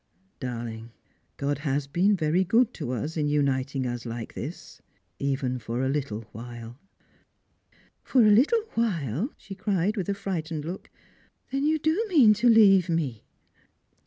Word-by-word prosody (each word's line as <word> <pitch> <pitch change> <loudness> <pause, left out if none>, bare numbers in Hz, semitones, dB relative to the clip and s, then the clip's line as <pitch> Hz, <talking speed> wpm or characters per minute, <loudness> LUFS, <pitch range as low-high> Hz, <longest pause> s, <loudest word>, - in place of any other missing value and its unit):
Darling, 115 -3 -5 0.5
God 145 0 -1
has 145 -1 -1
been 180 +9 +2
very 170 +1 +1
good 230 +6 +3
to 145 -7 -5
us 140 +7 -3
in 150 -1 +1
uniting 135 -2 0
us 120 -1 -3
like 115 -1 -6
this, - - -8 0.4
even 135 -2 -1
for 120 +3 -3
a - - 0
little 135 -6 -2
while." 120 +2 -9 0.6
" - - -36
For 250 -4 +6
a 210 - +6
Little 295 - +4
while! 180 - -1
" - - -44
she 200 - -10
cried, 195 +1 0
with 190 -2 -2
a 200 - 0
frightened 165 -6 -4
look 180 +4 -7 0.3
" - - -37
Then 275 +2 0
you 315 +1 +3
do 315 +7 +1
mean 265 - +6
to 235 +4 +3
leave 195 -6 +6
me 145 -10 -2
155 Hz, 160 wpm, -26 LUFS, 130-205 Hz, 0.6 s, For